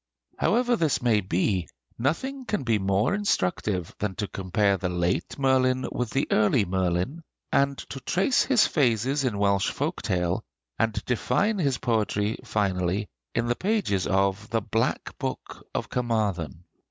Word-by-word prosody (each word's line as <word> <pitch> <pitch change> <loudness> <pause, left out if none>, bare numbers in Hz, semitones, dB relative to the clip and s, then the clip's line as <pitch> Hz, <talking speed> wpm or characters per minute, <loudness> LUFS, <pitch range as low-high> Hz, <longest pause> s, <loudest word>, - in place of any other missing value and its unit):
However 245 +2 +3
this 160 -9 +1
may 110 -4 +3
be, 95 0 0 0.3
nothing 260 - -1
can 210 - -1
be 115 -4 +2
more 100 - +1
instructive 95 - 0
than 100 -2 -2
to 105 - -2
compare 100 +2 +1
the 90 -1 -2
late 90 0 -1
Merlin 130 -1 +2
with 125 -2 -2
the 135 +4 0
early 105 +1 +3
Merlin, 95 - -1 0.3
and 140 0 +2
to 135 - -5
trace 190 - +2
his 260 -5 +4
phases 135 0 +1
in 120 -6 0
Welsh 100 -1 +2
folk - - -2
tale, 90 -1 0 0.4
and 115 -1 0
define 200 - +1
his 140 -6 +1
poetry 110 -3 0
finally 100 -3 0 0.3
in 115 - +1
the 120 0 +1
pages 185 - 0
of 100 +1 +1
the 115 -1 0
'Black 115 +2 -1
Book - - -5
of - - -1
Carmarthen.' 100 - -1
110 Hz, 150 wpm, -26 LUFS, 95-135 Hz, 0.4 s, his